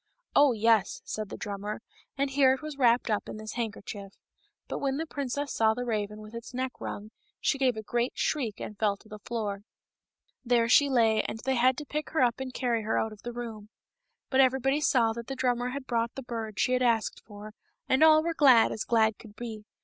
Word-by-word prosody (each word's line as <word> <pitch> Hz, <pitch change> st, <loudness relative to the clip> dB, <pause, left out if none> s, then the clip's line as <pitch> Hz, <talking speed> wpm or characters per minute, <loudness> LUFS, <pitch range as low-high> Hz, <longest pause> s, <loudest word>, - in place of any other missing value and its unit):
*^ -, -, -54 dB, 0.3 s
Oh, 285 Hz, -1 st, +6 dB
yes," 225 Hz, -3 st, +2 dB
said 215 Hz, -2 st, -4 dB
the -, -, -7 dB
drummer, 205 Hz, +1 st, -5 dB, 0.4 s
and 275 Hz, 0 st, 0 dB
here 270 Hz, -1 st, +5 dB
it 265 Hz, -, -13 dB
was 305 Hz, -1 st, -5 dB
wrapped 240 Hz, -2 st, +3 dB
up 210 Hz, -, -1 dB
in -, -, -6 dB
this 215 Hz, 0 st, -7 dB
handkerchief. 205 Hz, -3 st, -5 dB, 0.5 s
But -, -, -4 dB
when 275 Hz, -1 st, -1 dB
the 320 Hz, -, -2 dB
princess 285 Hz, -1 st, -3 dB
saw 220 Hz, -1 st, +3 dB
the 245 Hz, +1 st, -3 dB
raven 210 Hz, -2 st, -3 dB
with 215 Hz, +1 st, -12 dB
its 235 Hz, +2 st, -8 dB
neck 260 Hz, 0 st, -1 dB
wrung, 210 Hz, +1 st, -6 dB, 0.3 s
she 275 Hz, -, 0 dB
gave 255 Hz, -4 st, +2 dB
a 220 Hz, -, -5 dB
great 240 Hz, +3 st, -1 dB
shriek 245 Hz, -9 st, -1 dB
and 210 Hz, -, -6 dB
fell 205 Hz, -2 st, +1 dB
to 215 Hz, -, -20 dB
the 215 Hz, 0 st, -9 dB
floor. 205 Hz, -3 st, -4 dB, 0.8 s
There 240 Hz, -2 st, +2 dB
she 280 Hz, +4 st, +5 dB
lay 225 Hz, -4 st, +3 dB
and -, -, -5 dB
they 265 Hz, -, +2 dB
had 255 Hz, +1 st, +3 dB
to 300 Hz, -, -6 dB
pick 300 Hz, +2 st, -4 dB
her 315 Hz, -, +2 dB
up 240 Hz, 0 st, +1 dB
and 265 Hz, -1 st, -4 dB
carry 240 Hz, -3 st, -1 dB
her 220 Hz, +1 st, -1 dB
out 220 Hz, -1 st, -1 dB
of 210 Hz, -, -15 dB
the 240 Hz, -, -5 dB
room. 225 Hz, -3 st, -7 dB, 0.6 s
But 265 Hz, 0 st, +5 dB
everybody 270 Hz, +2 st, +2 dB
saw 235 Hz, -6 st, +3 dB
that 235 Hz, 0 st, -7 dB
the 270 Hz, -, -4 dB
drummer 250 Hz, -1 st, 0 dB
had 275 Hz, +1 st, -5 dB
brought 235 Hz, -2 st, -1 dB
the 270 Hz, -, -6 dB
bird 225 Hz, -3 st, -5 dB
she 255 Hz, -, +2 dB
had 255 Hz, -, +2 dB
asked 230 Hz, -3 st, +1 dB
for, 210 Hz, 0 st, -11 dB, 0.3 s
and 260 Hz, +4 st, +4 dB
all 310 Hz, 0 st, +7 dB
were 335 Hz, -, -1 dB
as -, -, -7 dB
glad 255 Hz, -6 st, +6 dB
as 220 Hz, -, -3 dB
glad 220 Hz, -2 st, +2 dB
could 210 Hz, -2 st, -14 dB
be. 220 Hz, -2 st, -7 dB
235 Hz, 230 wpm, -28 LUFS, 215-265 Hz, 0.8 s, all